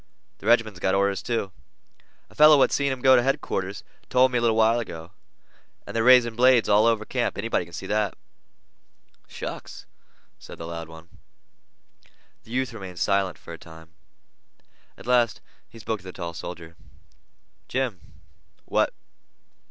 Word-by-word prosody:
The -, -, -8 dB
regiment's 115 Hz, -5 st, +2 dB
got 95 Hz, +1 st, +1 dB
orders, 100 Hz, 0 st, +1 dB
too. 115 Hz, -5 st, -2 dB, 0.8 s
A -, -, -21 dB
feller 150 Hz, 0 st, +7 dB
what 135 Hz, -, +4 dB
seen 140 Hz, -1 st, +1 dB
'em 130 Hz, -1 st, -4 dB
go 130 Hz, -1 st, +7 dB
to 120 Hz, -, +4 dB
headquarters 100 Hz, -6 st, -2 dB, 0.3 s
told 130 Hz, 0 st, +4 dB
me 125 Hz, -, +1 dB
a -, -, -3 dB
little 115 Hz, -2 st, +2 dB
while 115 Hz, +1 st, +4 dB
ago. 80 Hz, -7 st, -8 dB, 0.7 s
And -, -, -9 dB
they're 115 Hz, -, +1 dB
raising 125 Hz, -2 st, +5 dB
blazes 125 Hz, -1 st, +4 dB
all 105 Hz, +2 st, +5 dB
over 110 Hz, -2 st, +1 dB
camp—anybody 115 Hz, -6 st, -1 dB
can 85 Hz, -, -16 dB
see 90 Hz, -, -6 dB
that." 105 Hz, 0 st, -1 dB, 1.1 s
"Shucks!" -, -, -8 dB, 0.5 s
said -, -, -11 dB
the 80 Hz, -, -7 dB
loud 85 Hz, -1 st, -6 dB
one. 80 Hz, +1 st, -13 dB, 1.4 s
The -, -, -18 dB
youth 130 Hz, -1 st, -1 dB
remained 95 Hz, -5 st, -9 dB
silent 100 Hz, +1 st, 0 dB
for 85 Hz, -, -11 dB
a 85 Hz, -, -10 dB
time. 80 Hz, 0 st, -15 dB, 1.0 s
At -, -, -13 dB
last 120 Hz, -2 st, +2 dB, 0.3 s
he -, -, -15 dB
spoke 110 Hz, -1 st, -4 dB
to 95 Hz, -, -19 dB
the 95 Hz, -, -7 dB
tall 85 Hz, -1 st, -6 dB
soldier. 85 Hz, 0 st, -9 dB, 0.9 s
"Jim!" 125 Hz, -9 st, -2 dB, 0.6 s
"What?" -, -, 0 dB
110 Hz, 155 wpm, -25 LUFS, 90-120 Hz, 1.4 s, feller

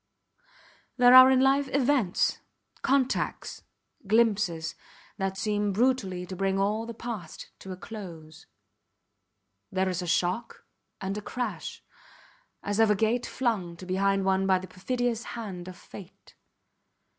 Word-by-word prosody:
There 245 Hz, 0 st, +7 dB
are 255 Hz, 0 st, +11 dB
in 260 Hz, -1 st, +4 dB
life 270 Hz, +1 st, +3 dB
events, 265 Hz, -8 st, +1 dB, 0.4 s
contacts, 265 Hz, -1 st, 0 dB, 0.5 s
glimpses, 200 Hz, -7 st, +2 dB, 0.5 s
that 195 Hz, 0 st, -2 dB
seem 205 Hz, 0 st, 0 dB
brutally 200 Hz, -6 st, 0 dB
to 185 Hz, -, -7 dB
bring 195 Hz, +1 st, 0 dB
all 210 Hz, +3 st, 0 dB
the 235 Hz, -, -7 dB
past 220 Hz, -9 st, -7 dB
to 190 Hz, -, -9 dB
a 185 Hz, -, -6 dB
close. 170 Hz, -7 st, -10 dB, 1.2 s
There 190 Hz, 0 st, 0 dB
is 180 Hz, -1 st, -2 dB
a 180 Hz, -, -5 dB
shock 180 Hz, +7 st, -1 dB, 0.4 s
and 195 Hz, +2 st, -3 dB
a -, -, -9 dB
crash, 245 Hz, +4 st, -5 dB, 0.8 s
as 205 Hz, +1 st, -2 dB
of 225 Hz, -1 st, +5 dB
a 210 Hz, -, +4 dB
gate 225 Hz, +4 st, 0 dB
flung 200 Hz, -10 st, -2 dB
to 185 Hz, -, -10 dB
behind 195 Hz, +1 st, +1 dB
one 190 Hz, 0 st, +2 dB
by 190 Hz, -1 st, +4 dB
the 185 Hz, 0 st, -7 dB
perfidious 240 Hz, +4 st, -2 dB
hand 190 Hz, -6 st, -6 dB
of 185 Hz, -1 st, -9 dB
fate. 195 Hz, -1 st, -13 dB
200 Hz, 135 wpm, -27 LUFS, 185-235 Hz, 1.2 s, are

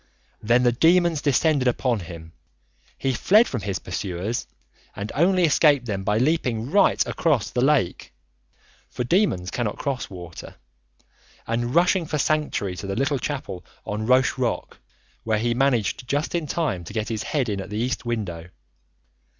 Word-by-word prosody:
Then 120 Hz, +3 st, +3 dB
the 120 Hz, -, +4 dB
demons 165 Hz, +4 st, +3 dB
descended 145 Hz, -1 st, +2 dB
upon 125 Hz, -1 st, +1 dB
him. 85 Hz, -2 st, -10 dB, 0.6 s
He 135 Hz, -, 0 dB
fled 210 Hz, -, +4 dB
from 125 Hz, -, -4 dB
his 95 Hz, -1 st, -2 dB
pursuers, 90 Hz, +5 st, -4 dB, 0.5 s
and 100 Hz, +2 st, -5 dB
only 180 Hz, +4 st, +3 dB
escaped 145 Hz, -4 st, +4 dB
them 100 Hz, -4 st, -3 dB
by 105 Hz, +2 st, +1 dB
leaping 125 Hz, -3 st, 0 dB
right 200 Hz, -, +4 dB
across 145 Hz, -10 st, 0 dB
the 125 Hz, -, 0 dB
lake 135 Hz, -10 st, +1 dB, 0.8 s
for -, -, -3 dB
demons 120 Hz, -, +1 dB
cannot 115 Hz, -4 st, -2 dB
cross 135 Hz, -3 st, -3 dB
water 90 Hz, -3 st, -10 dB, 0.9 s
and 120 Hz, +3 st, -2 dB
rushing 175 Hz, 0 st, +3 dB
for 155 Hz, -, -1 dB
sanctuary 145 Hz, -10 st, 0 dB
to 100 Hz, -, -6 dB
the 95 Hz, -, -2 dB
little 135 Hz, +3 st, 0 dB
chapel 130 Hz, -12 st, -5 dB, 0.2 s
on 105 Hz, -, -3 dB
the 110 Hz, -, -3 dB
Roche 130 Hz, +1 st, +3 dB
Rock, 125 Hz, -3 st, -2 dB, 0.4 s
where 110 Hz, -1 st, +1 dB
he 120 Hz, +2 st, 0 dB
managed 125 Hz, -2 st, 0 dB
just 145 Hz, +3 st, -1 dB
in 170 Hz, -3 st, -1 dB
time 135 Hz, -, -1 dB
to -, -, -9 dB
get 110 Hz, -1 st, -2 dB
his 110 Hz, -2 st, -2 dB
head 140 Hz, -5 st, -1 dB
in 100 Hz, -2 st, -2 dB
at 95 Hz, -, -8 dB
the 105 Hz, -, -4 dB
east 125 Hz, +4 st, -1 dB
window. 95 Hz, -8 st, -4 dB
120 Hz, 165 wpm, -24 LUFS, 105-145 Hz, 0.9 s, the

